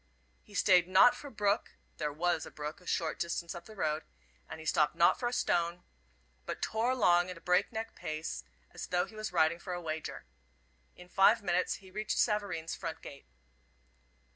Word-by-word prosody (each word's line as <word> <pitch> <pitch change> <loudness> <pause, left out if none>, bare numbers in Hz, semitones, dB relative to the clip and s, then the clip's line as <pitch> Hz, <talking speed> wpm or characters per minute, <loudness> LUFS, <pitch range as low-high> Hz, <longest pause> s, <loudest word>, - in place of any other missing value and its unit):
He 65 - -16
stayed 180 -2 +5
not 190 +7 +7
for 285 - -9
brook 205 -4 0 0.2
there 150 -1 -1
was 165 +1 0
a - - -8
brook 150 +5 -6
a 180 - -17
short 160 -3 -1
distance 170 0 -2
up 175 - -9
the 220 - -12
road 155 -4 0 0.5
and - - -7
he 160 - -10
stopped 150 -1 +2
not 170 - +4
for 240 -1 -1
stone, 175 -7 0 0.6
but - - -4
tore 225 +3 0
along 180 -8 +4
at 180 - -6
a - - -11
break 180 +1 +2
neck 225 0 -5
pace 155 - -5 0.3
as - - -7
though 180 0 +1
he - - -15
was 215 0 -4
riding 170 -1 +3
for 180 0 -5
a 175 - -3
wager. 160 - -5 0.7
In 180 - -13
five 205 +4 +4
minutes 180 -1 +1
he 190 -1 -14
reached 215 +2 -2
Savareen's 200 -6 0
front 165 - -6
gate. 140 - -11
175 Hz, 190 wpm, -32 LUFS, 160-205 Hz, 0.7 s, not